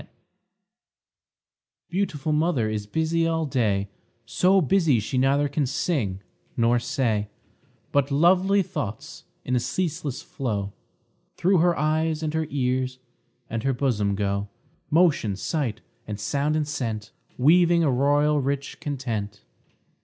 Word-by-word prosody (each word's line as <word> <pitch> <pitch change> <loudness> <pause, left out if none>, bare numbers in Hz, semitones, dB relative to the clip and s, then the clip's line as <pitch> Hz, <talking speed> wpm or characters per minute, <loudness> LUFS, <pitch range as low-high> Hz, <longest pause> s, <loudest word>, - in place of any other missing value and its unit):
_ - - -19 1.8
Beautiful 170 -5 -1
mother 150 -7 +1
is 105 -1 -4
busy 160 +6 0
all 165 -1 0
day, 105 -8 0 0.4
So 180 - +3
busy 165 -6 +3
she 120 +5 -2
neither 140 +2 +3
can 140 0 -1
sing 125 - -1 0.3
nor 120 +1 +3
say; 120 -5 -1 0.6
But 140 -1 +2
lovely 185 +7 +4
thoughts, 110 - -6 0.2
in 125 - 0
a - - +3
ceaseless 150 -2 -3
flow, 100 -7 -3 0.6
Through 185 +1 +3
her 175 +1 +3
eyes, 155 +1 0
and 155 -1 -2
her 160 -1 -1
ears, 130 -2 -1 0.5
and 115 0 -3
her 135 +3 +1
bosom 110 -7 0
go 100 0 -1 0.4
Motion, 150 - +3
sight, 120 - -2 0.3
and 105 -1 -5
sound, 145 +7 0
and 155 -1 0
scent, 115 -7 -4 0.3
Weaving 170 +5 +5
a 145 - +3
royal, 145 +3 +2
rich 140 +1 -3
content. 120 -9 -4
140 Hz, 130 wpm, -25 LUFS, 115-160 Hz, 1.8 s, Weaving